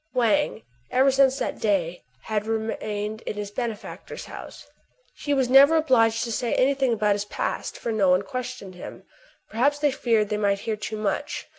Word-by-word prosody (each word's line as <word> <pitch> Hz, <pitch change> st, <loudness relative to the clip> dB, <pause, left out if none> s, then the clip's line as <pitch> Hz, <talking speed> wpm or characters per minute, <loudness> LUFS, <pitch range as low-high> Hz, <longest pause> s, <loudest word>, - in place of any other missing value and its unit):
Wang, 250 Hz, -, +1 dB, 0.3 s
ever 265 Hz, +2 st, +4 dB
since 270 Hz, 0 st, +3 dB
that -, -, -3 dB
day, 185 Hz, -6 st, 0 dB, 0.2 s
had 215 Hz, -1 st, -2 dB
remained 220 Hz, -1 st, -3 dB
in -, -, -5 dB
his 205 Hz, -1 st, -5 dB
benefactor's 225 Hz, -1 st, -6 dB
house. -, -, -10 dB, 0.5 s
He 290 Hz, -, -5 dB
was 265 Hz, -3 st, +2 dB
never 275 Hz, +5 st, +7 dB
obliged 230 Hz, -8 st, +3 dB
to 235 Hz, -, -4 dB
say 235 Hz, +1 st, -1 dB
any 270 Hz, +2 st, +3 dB
thing 265 Hz, -2 st, 0 dB
about 210 Hz, -2 st, +2 dB
his 205 Hz, 0 st, -3 dB
past; -, -, -4 dB
for 235 Hz, -, -3 dB
no 205 Hz, -4 st, +2 dB
one 180 Hz, +2 st, +3 dB
questioned 250 Hz, -4 st, -6 dB
him. 180 Hz, -, -10 dB, 0.5 s
Perhaps 275 Hz, +6 st, +2 dB
they 290 Hz, -1 st, +2 dB
feared 225 Hz, -5 st, +1 dB
they 210 Hz, -, -1 dB
might 200 Hz, -1 st, +1 dB
hear 220 Hz, -, -2 dB
too 215 Hz, +1 st, -5 dB
much. 215 Hz, +9 st, -2 dB
225 Hz, 180 wpm, -25 LUFS, 210-265 Hz, 0.5 s, never